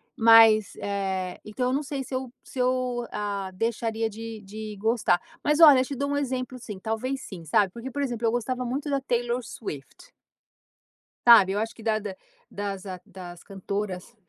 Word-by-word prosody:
Mas 225 -3 +6
eh, 190 -2 -2
então 230 +4 -2
eu - - 0
não 280 - +1
sei 280 -2 -4
se 260 - -10
eu 255 -1 -3
se 265 - -9
eu, 250 -1 0
ah, 200 -2 -3
deixaria 225 +1 -1
de 225 0 -8
de 210 +1 -8
gostar. 215 -3 +2 0.2
Mas 300 +1 +2
olha, 295 -5 +10
eu 255 - +2
te 280 - -5
dou 280 +2 -2
um 285 - 0
exemplo 255 -2 -3
sim, 220 -5 -8
talvez 240 +6 -3
sim, 180 -8 -9
sabe, 195 +4 +2
porque, 235 +6 -7
por 285 +3 -4
exemplo, 240 -4 -1
eu - - +2
gostava 250 +2 -2
muito 275 +5 -3
da 280 -1 +1
Taylor 240 -1 -1
Swift. 220 - -9 1.2
Sabe, 220 -5 +9
eu 200 - 0
acho 225 +1 -3
que 225 - -13
da 215 -1 +1
da 205 -3 -6 0.3
das 200 -2 -5 0.2
das 175 -2 -10
cantoras 200 +1 -5
225 Hz, 185 wpm, -26 LUFS, 205-255 Hz, 1.2 s, olha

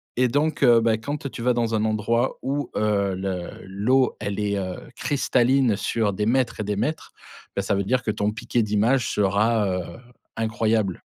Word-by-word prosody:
et 125 +1 +3
donc 145 +5 0
heu, 120 -3 +7
bah, 115 -1 +2
quand 140 +5 -5
tu - - -7
vas 125 +1 +2
dans 115 -1 -1
un 110 0 +1
endroit 110 +3 0
où 140 +2 -2
heu, 100 -3 +1
le 95 -2 -3 0.2
l'eau, 120 +7 +1
elle 100 -1 -3
est, 100 -1 0
heu, 95 -2 -4 0.2
cristalline 130 -3 +2
sur 105 0 -1
des 105 +2 -1
mètres 125 -2 +1
et - - -1
des 105 0 -2
mètres, 125 +10 -3 0.4
bah, 100 - 0
ça 100 - 0
veut 100 - 0
dire 125 +5 0
que 105 - 0
ton 105 0 -1
piqué 115 +2 -1
d'image 110 +4 +1
sera, 105 +2 +2
heu, 90 -1 -1 0.5
incroyable. 110 -3 0
110 Hz, 190 wpm, -24 LUFS, 100-125 Hz, 0.5 s, heu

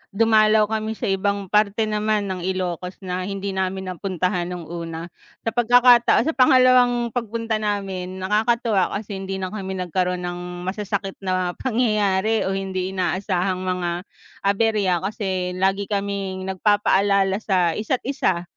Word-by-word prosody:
dumalaw 215 -1 +4
kami 220 0 -2
sa - - -10
ibang 200 +1 0
parte 210 +1 +2
naman 210 -1 0
ng 185 - -4
Ilocos 180 -1 -3
na 180 0 -3
hindi 195 0 -3
namin 190 0 -2
napuntahan 180 -1 -2
no'ng 175 -3 -6
una. 165 -1 -6 0.4
Sa 225 - +2
pagkakataon 240 0 +5
sa 320 - 0
pangalawang 250 -2 +5
pagpunta 230 -1 -2
namin 195 -3 -3
nakakatuwa 215 0 +2
kasi 205 -1 -7
hindi 195 0 -4
na 185 - -2
kami 190 -3 -5
nagkaroon 180 0 -1
ng 175 0 -5 0.3
masasakit 200 0 -3
na 185 -1 0
pangyayari 215 -4 +1
o 190 - 0
hindi 190 -1 -3
inaasahang 185 0 -1
mga 180 -1 -1 0.5
aberya 200 -3 +2
kasi 190 -3 -2
lagi 195 +1 +1
kaming 200 -2 -3
nagpapaalala 195 0 +2
sa 185 -5 +2
isa't 230 +4 -1
isa, 190 -10 0
195 Hz, 135 wpm, -22 LUFS, 185-215 Hz, 0.5 s, pagkakataon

